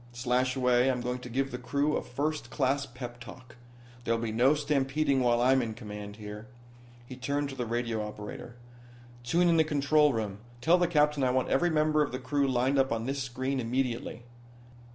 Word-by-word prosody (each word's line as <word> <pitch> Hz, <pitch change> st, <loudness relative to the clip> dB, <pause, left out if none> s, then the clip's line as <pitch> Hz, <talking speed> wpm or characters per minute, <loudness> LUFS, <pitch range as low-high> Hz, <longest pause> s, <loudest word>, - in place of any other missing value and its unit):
Slashaway, 125 Hz, +1 st, +2 dB
I'm 125 Hz, -2 st, 0 dB
going 125 Hz, +1 st, -3 dB
to 125 Hz, -, -9 dB
give 135 Hz, +3 st, -1 dB
the 125 Hz, -, -5 dB
crew 145 Hz, +4 st, 0 dB
a -, -, 0 dB
first 150 Hz, +4 st, -3 dB
class 140 Hz, +1 st, 0 dB
pep 120 Hz, -1 st, -8 dB
talk. 125 Hz, +1 st, -12 dB, 0.5 s
There'll 115 Hz, -1 st, 0 dB
be 115 Hz, -1 st, -2 dB
no 125 Hz, +6 st, +4 dB
stampeding 145 Hz, -1 st, +1 dB
while 120 Hz, -2 st, +3 dB
I'm 130 Hz, +1 st, +4 dB
in 115 Hz, -2 st, -4 dB
command 105 Hz, -3 st, -8 dB
here." 105 Hz, +1 st, -9 dB, 0.6 s
He 130 Hz, -, -9 dB
turned 140 Hz, +2 st, -2 dB
to 135 Hz, -, -7 dB
the 125 Hz, -2 st, -3 dB
radio 115 Hz, -1 st, -1 dB
operator. 105 Hz, +2 st, -8 dB, 0.7 s
"Tune 170 Hz, +9 st, +2 dB
in 170 Hz, -1 st, +4 dB
the 160 Hz, -, +6 dB
control 150 Hz, 0 st, +3 dB
room. 105 Hz, -4 st, -3 dB, 0.2 s
Tell 165 Hz, +8 st, +4 dB
the 175 Hz, -, +3 dB
captain 150 Hz, -3 st, +2 dB
I 130 Hz, -, +3 dB
want 130 Hz, 0 st, 0 dB
every 175 Hz, -, +2 dB
member 155 Hz, -1 st, +2 dB
of 145 Hz, -, 0 dB
the 130 Hz, -, -3 dB
crew 140 Hz, +2 st, 0 dB
lined 130 Hz, +2 st, +1 dB
up 135 Hz, -2 st, +2 dB
on 115 Hz, 0 st, -1 dB
this 135 Hz, +1 st, -2 dB
screen 130 Hz, +2 st, -2 dB
immediately." 120 Hz, 0 st, -2 dB
130 Hz, 195 wpm, -29 LUFS, 120-140 Hz, 0.7 s, the